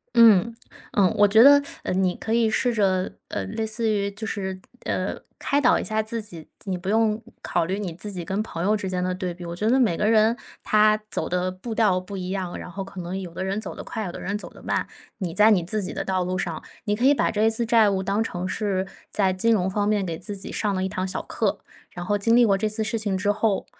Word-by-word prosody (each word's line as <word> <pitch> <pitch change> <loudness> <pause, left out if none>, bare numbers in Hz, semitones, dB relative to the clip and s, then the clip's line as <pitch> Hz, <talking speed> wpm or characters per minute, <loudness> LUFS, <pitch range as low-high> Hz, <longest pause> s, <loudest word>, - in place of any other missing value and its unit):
嗯， 230 -1 +6 0.4
嗯， 195 -3 +4
我 205 - +7
觉 210 +2 +6
得， 285 +3 +8 0.2
呃， - - -1
你 185 -1 +1
可 220 - -3
以 230 -1 +3
试 245 +2 +1
着 190 -4 +1 0.2
呃， 95 - -3
类 220 - -3
似 220 +1 -1
于 200 -1 0
就 215 +2 -6
是， 190 -3 -3 0.2
呃， - - -2 0.2
开 285 +1 +1
导 255 - +4
一 - - -3
下 220 0 0
自 225 +1 -3
己。 170 -7 -8 0.2
你 190 -2 -2
不 185 +2 -5
用 220 0 +2 0.2
考 175 - 0
虑 190 +4 -2
你 190 -5 -4
自 205 +5 -7
己 180 -3 -4
跟 195 +5 -1
朋 165 -6 -6
友 210 +3 +3
之 200 -3 -3
间 180 -1 -1
的 180 0 -1
对 185 -1 -3
比， 175 0 -9
我 170 0 -5
觉 215 +5 0
得 260 +3 +4
每 225 -9 +3
个 210 - 0
人 220 +1 +4 0.3
他 215 0 +4
走 - - -3
的 180 +1 0
步 185 +5 -6
调 215 -5 +3
不 185 +2 -5
一 185 -1 -4
样， 190 -2 -3
然 - - -8
后 195 +2 -5
可 190 0 -9
能 175 +2 -4
有 180 -3 -7
的 - - -5
人 195 +2 -1
走 200 - -5
得 - - -8
快， 220 - -4
有 180 - -4
的 - - -8
人 200 +2 -2
走 - - -8
得 - - -16
慢。 - - -1 0.3
你 180 -5 -3
在 210 +4 +6
你 195 -6 +4
自 210 +5 -2
己 185 - -4
的 - - -3
道 185 -1 0
路 185 +1 -2
上， 170 -4 -3 0.2
你 205 - 0
可 235 +5 0
以 280 - +7
把 - - +1
这 215 0 0
一 220 - +5
次 225 +1 -1
债 225 -2 +5
务 190 -1 -1
当 200 +3 0
成 185 -5 -3
是 190 -1 -1 0.3
在 195 -2 +2
金 210 +5 +2
融 190 -3 +1
方 205 +1 0
面 210 -2 +1
给 165 -2 -3
自 205 - -5
己 195 - -5
上 205 -2 -1
了 185 - -1
一 190 - -1
堂 185 0 -2
小 185 - -3
课， 200 -2 -1 0.3
然 175 -1 -7
后 205 +3 +1
经 230 +3 +3
历 240 0 +6
过 200 -3 +3
这 215 +2 0
次 215 +1 -1
事 220 +1 -1
情 205 -3 -1
之 205 +2 +1
后 210 -1 0
200 Hz, 295 characters per minute, -24 LUFS, 185-220 Hz, 0.4 s, 得